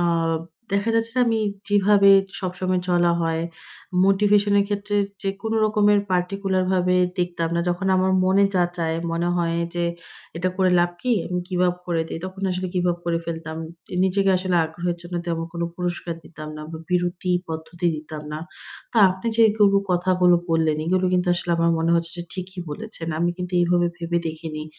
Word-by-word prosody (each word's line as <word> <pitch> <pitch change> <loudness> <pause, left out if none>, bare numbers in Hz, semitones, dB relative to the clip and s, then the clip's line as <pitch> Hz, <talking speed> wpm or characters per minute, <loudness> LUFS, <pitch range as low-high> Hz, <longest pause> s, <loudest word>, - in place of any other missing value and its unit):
আ - - +2 0.7
দেখা 200 +3 +1
যাচ্ছে 230 0 +1
যে - - +4
আমি 225 -1 +2 0.3
যেভাবে 205 0 +5 0.3
সবসময় 185 -1 -1
চলা 175 -1 +3
হয়, 165 -1 0 0.6
motivation 205 +1 +3
এর 200 - +3
ক্ষেত্রে 205 0 -2 0.3
যেকোনো 200 +3 -2
রকমের 210 -1 +4
particular 185 +1 0
ভাবে 180 0 +2 0.2
দেখতাম 175 -2 -1
না। 170 - +1
যখন 175 +2 -1
আমার 185 0 +2
মনে 195 +2 +4
যা 180 -1 +4
চায়, 165 -1 -1
মনে 170 +1 0
হয় 170 -1 0 0.2
যে 175 - 0 0.5
এটা 180 +2 0
করে 185 -1 +3
লাভ 175 - +2
কি? 250 -1 +1
আমি 180 0 -2
গিভ-আপ 180 -1 +1
করে 170 -2 0
দেই। 165 - -5
তখন 190 +1 -7
আসলে 180 +1 -2
গিভ-আপ 175 -1 +1
করে 170 -1 0
ফেলতাম। 160 -1 -5 0.4
এ - - -3
নিজেকে 195 +1 +2
আসলে 185 -1 0
আগ্রহের 170 +2 -3
জন্য 175 +1 -8
তেমন 165 -1 -1
কোন 170 -1 -4
পুরস্কার 175 -1 -3
দিতাম 155 -1 -9
না 155 - -7
বা 160 - -6
বিরতি 180 0 -1 0.2
পদ্ধতি 165 +2 -4
দিতাম 155 0 -8
না। 150 - -3 0.5
তা 230 - +2
আপনি 190 +4 -6
যে - - +3
এগুলো 205 -2 +4
কথাগুলো 180 0 +3 0.2
বললেন 160 -2 +2
এগুলো 185 +2 +1
কিন্তু 180 0 +1
আসলে 175 0 -3
আমার 165 0 +2
মনে 165 +1 +1
হচ্ছে 170 0 0
যে 175 - -4
ঠিকই 185 0 -6
বলেছেন। 190 -1 -6
আমি 175 +1 +2
কিন্তু 180 0 -5
এইভাবে 175 0 +3
ভেবে 170 0 -1
দেখিনি। 155 -1 -6
180 Hz, 180 wpm, -23 LUFS, 170-195 Hz, 0.7 s, যেভাবে